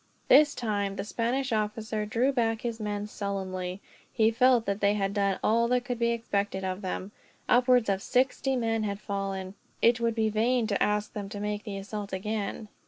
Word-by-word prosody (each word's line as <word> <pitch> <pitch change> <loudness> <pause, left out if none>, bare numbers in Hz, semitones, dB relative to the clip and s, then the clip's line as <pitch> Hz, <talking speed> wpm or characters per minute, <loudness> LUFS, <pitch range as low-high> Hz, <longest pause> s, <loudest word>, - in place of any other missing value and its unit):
This 290 +2 +6
time, 205 -4 -1
the 195 - -3
Spanish 240 +5 -1
officer 215 0 -2
drew 240 +5 +2
back 225 -4 0
his 235 -2 -3
men 205 -1 -3
sullenly. 190 -2 -4 0.3
He 220 -1 +3
felt 245 0 +4
that 200 +1 -2
they 205 0 +3
had 195 -1 -1
done 200 -2 +1
all 230 +2 +3
that 250 0 +1
could 245 -1 -3
be 235 0 +2
expected 205 -4 -1
of 185 +1 -3
them. 190 +1 -4 0.4
Upwards 250 -1 +4
of 195 -1 0
sixty 260 +3 +1
men 225 -2 0
had 200 -2 -2
fallen. 195 -2 -4 0.3
It 235 +1 +4
would 230 -1 0
be 220 -1 +2
vain 230 +3 +2
to 205 -2 -1
ask 210 0 +1
them 200 -2 -5
to 205 0 -6
make 210 +1 -3
the 200 -2 -5
assault 200 0 -6
again. 210 +2 -3
215 Hz, 190 wpm, -28 LUFS, 200-235 Hz, 0.4 s, This